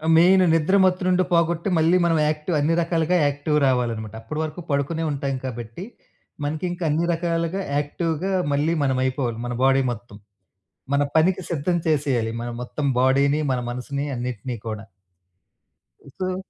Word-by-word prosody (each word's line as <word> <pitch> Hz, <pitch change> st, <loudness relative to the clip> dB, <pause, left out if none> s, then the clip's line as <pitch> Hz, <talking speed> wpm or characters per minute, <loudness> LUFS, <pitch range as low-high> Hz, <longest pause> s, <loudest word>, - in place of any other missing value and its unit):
Main 185 Hz, +3 st, +6 dB
నిద్ర 165 Hz, +4 st, +2 dB
మత్తు 185 Hz, 0 st, +2 dB
నుండి 185 Hz, 0 st, +3 dB
పోగొట్టి 170 Hz, +2 st, +2 dB
మళ్ళీ 165 Hz, +3 st, +4 dB
మనం 165 Hz, -1 st, +2 dB
యాక్టివ్ 155 Hz, +2 st, -1 dB
అన్ని 155 Hz, +3 st, +2 dB
రకాలుగా 170 Hz, +1 st, +1 dB
యాక్టివ్ 145 Hz, +1 st, 0 dB
రావాలనమాట. 115 Hz, -4 st, 0 dB
అప్పటి 150 Hz, +8 st, -5 dB
వరకు 155 Hz, +3 st, -5 dB
పడుకునే 145 Hz, +4 st, 0 dB
ఉంటాం 140 Hz, -1 st, -2 dB
కాబట్టి 120 Hz, -, -6 dB, 0.6 s
మనకింకా 175 Hz, +4 st, -3 dB
అన్ని 160 Hz, +3 st, +1 dB
రకాలుగా 170 Hz, +2 st, -1 dB, 0.2 s
యాక్టివ్‌‌గా 165 Hz, +5 st, -2 dB, 0.2 s
మళ్ళీ 150 Hz, +4 st, +1 dB
మనమైపోవాలి 130 Hz, -3 st, 0 dB
మన 120 Hz, -, -3 dB
బాడీ 135 Hz, 0 st, +4 dB
మొత్తం. 110 Hz, -2 st, -9 dB, 0.8 s
మన 140 Hz, -, +3 dB, 0.2 s
పనికి 185 Hz, +3 st, +3 dB
సిద్ధం 170 Hz, +3 st, 0 dB
చేసేయాలి 135 Hz, -7 st, +1 dB
మన 120 Hz, -, -4 dB
మొత్తం 140 Hz, +4 st, -4 dB
బాడీ‌ని 140 Hz, +3 st, +3 dB
మన 125 Hz, -, 0 dB
మనసుని 140 Hz, +3 st, -4 dB
అన్నిటిని 120 Hz, 0 st, -4 dB
కూడా. 110 Hz, -2 st, -4 dB, 1.4 s
సో 185 Hz, 0 st, -1 dB
150 Hz, 140 wpm, -23 LUFS, 130-170 Hz, 1.4 s, Main